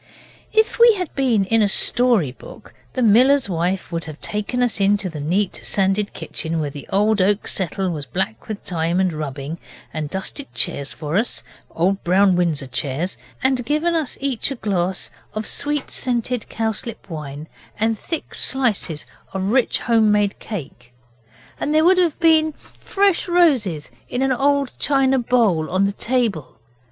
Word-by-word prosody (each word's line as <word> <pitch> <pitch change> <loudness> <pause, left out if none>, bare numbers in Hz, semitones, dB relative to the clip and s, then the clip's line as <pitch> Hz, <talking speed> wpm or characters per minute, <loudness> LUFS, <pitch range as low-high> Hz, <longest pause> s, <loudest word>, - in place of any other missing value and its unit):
If 440 +1 +2
we 470 -1 +7
had 360 -5 -4
been 240 -8 +2
in 225 +3 +3
a 210 - +4
story 230 - +3
book 125 - -14 0.2
the 255 - 0
miller's 255 +5 +5
wife 180 +1 -2
would 165 -1 -3
have 155 -1 -8
taken 210 +4 -2
us 235 -4 +1
into 200 -1 +2
the 155 - -7
neat 180 +7 0
sanded 195 +1 0
kitchen 165 0 -3
where 150 -2 -2
the 145 -1 -9
old 210 +1 +3
oak 200 +2 +1
settle 190 0 -1
was 150 -4 -5
black 110 -2 -2
with 215 -2 -6
time 170 0 0
and 185 -3 +1
rubbing, 150 +1 -5 0.3
and 155 -2 -3
dusted 195 - -3
chairs 145 -6 0
for 155 +2 -3
us 225 +4 -1 0.3
old 190 +4 0
brown 190 +1 +4
Windsor 165 -6 0
chairs 140 +7 -2 0.3
and 260 -1 +2
given 305 +6 0
us 320 -5 -1
each 270 -3 0
a 275 - -4
glass 190 -5 -1 0.2
of 215 0 -3
sweet 290 +3 -2
scented 245 -2 -2
cowslip 225 0 -3
wine 150 -3 -7 0.3
and 225 +1 +2
a - - -20
thick 330 - -5
slice 250 -8 0 0.4
of 190 +1 -1
rich 255 0 +2
home 225 -3 +3
made 205 -1 +1
cake. 130 - -8 0.7
And 300 - -1
there 315 +1 +4
would 365 +1 +5
have 340 -5 +1
been 315 -2 +4
fresh 395 +4 -1
roses 260 - +2 0.2
in 250 +2 -1
an 270 - +1
old 280 +1 +1
china 270 -2 +2
bowl 225 -10 +2
on 190 +2 +2
the 200 - +1
table. 215 - -1
205 Hz, 165 wpm, -21 LUFS, 170-260 Hz, 0.7 s, we